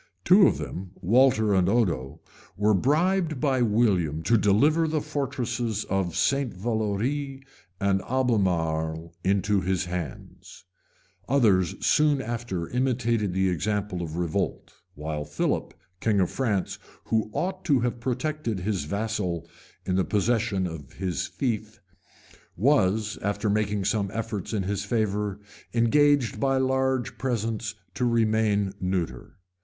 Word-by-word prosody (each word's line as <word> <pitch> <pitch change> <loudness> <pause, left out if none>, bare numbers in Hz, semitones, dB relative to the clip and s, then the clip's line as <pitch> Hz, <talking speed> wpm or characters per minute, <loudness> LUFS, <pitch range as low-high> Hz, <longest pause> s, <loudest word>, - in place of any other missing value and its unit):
Two 190 +1 +7
of - - +1
them, 95 0 -6
Walter 110 +1 +3
and 95 -1 +3
Odo, 80 - 0 0.4
were 105 +1 +3
bribed 155 - +1
by 135 -3 +1
William 100 -9 +2
to 115 - +3
deliver 140 +11 +3
the 155 0 0
fortresses 125 -6 -2
of 95 -4 0
St. 135 +8 +1
Valori 120 +7 -2 0.4
and 100 -1 +1
Albemarle 85 -10 0
into 100 +1 +2
his 95 0 0
hands: 90 -1 -7 0.6
others 105 - +3
soon 150 -2 +4
after 115 -8 -3
imitated 120 -5 0
the 95 0 +2
example 100 +1 -1
of 80 -2 -5
revolt, 90 +2 -2 0.2
while 75 0 -4
Philip, - - -1 0.3
king 105 -1 +2
of 90 - +1
France, 105 -8 -1 0.2
who 110 -1 0
ought 185 - -3
to 140 -7 +3
have 120 0 -1
protected 125 -3 -2
his 95 -5 -1
vassal 100 -3 -2 0.4
in 90 - 0
the 95 - +3
possession 105 -1 +1
of 80 -4 -7
his 90 -5 -2
fief, 120 -5 -3 0.8
was, 110 - +2
after 100 +1 -1
making 105 -1 0
some 100 -1 0
efforts 110 -4 -4
in 105 -4 -1
his 100 +1 -2
favor, 105 -3 -1 0.4
engaged 140 +2 +3
by 135 -1 +2
large 130 -1 0
presents 115 -3 -2 0.2
to - - -3
remain 110 -4 +2
neuter. 90 -9 -3
105 Hz, 130 wpm, -26 LUFS, 95-125 Hz, 0.8 s, Two